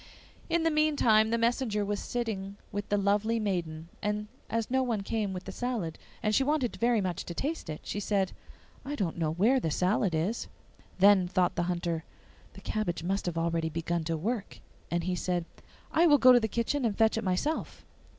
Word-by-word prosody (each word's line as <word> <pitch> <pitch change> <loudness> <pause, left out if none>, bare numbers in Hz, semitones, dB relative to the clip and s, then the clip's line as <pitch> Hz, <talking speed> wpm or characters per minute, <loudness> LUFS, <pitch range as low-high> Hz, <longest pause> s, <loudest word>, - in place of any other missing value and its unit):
In 335 -1 +2
the 325 - +3
meantime, 285 -8 +4
the 230 - +1
messenger 230 -3 +1
was 205 0 -2
sitting 200 -5 -3
with 205 0 -4
the 205 - +2
lovely 205 +3 +1
maiden, 170 -6 -2
and 210 0 -2 0.2
as 230 +1 -2
no 260 0 +3
one 235 -5 0
came 210 0 -2
with 185 -1 -5
the 195 - -7
salad, 220 -8 -3 0.2
and 215 - +1
she 270 - +4
wanted 280 -4 0
very 235 -2 +2
much 185 -1 -2
to 170 - -6
taste 300 - -3
it, 155 - -5
she 205 - -4
said, 200 -2 0 0.5
'I 290 +2 -4
don't 180 - -2
know 160 -2 +1
where 220 +11 +3
the 165 - -1
salad 185 +2 +1
is.' 185 +9 -1 0.5
Then 190 -1 +6
thought 185 0 +1
the 175 0 -1
Hunter, 170 -2 -1 0.5
'The - - -12
cabbage 175 -6 -2
must 195 +2 -1
have 170 -2 -2
already 165 -1 0
begun 165 +1 -2
to 165 0 -1
work.' 210 +5 -3 0.3
And 170 0 0
he 185 +1 -1
said, 175 -1 -1 0.5
'I 335 +2 +4
will 295 -2 +7
go 255 -1 +7
to 245 - +7
the 220 - 0
kitchen 235 +6 -1
and 220 -4 0
fetch 220 -1 +4
it 225 - -2
myself. 190 +12 -2
205 Hz, 200 wpm, -29 LUFS, 175-235 Hz, 0.5 s, will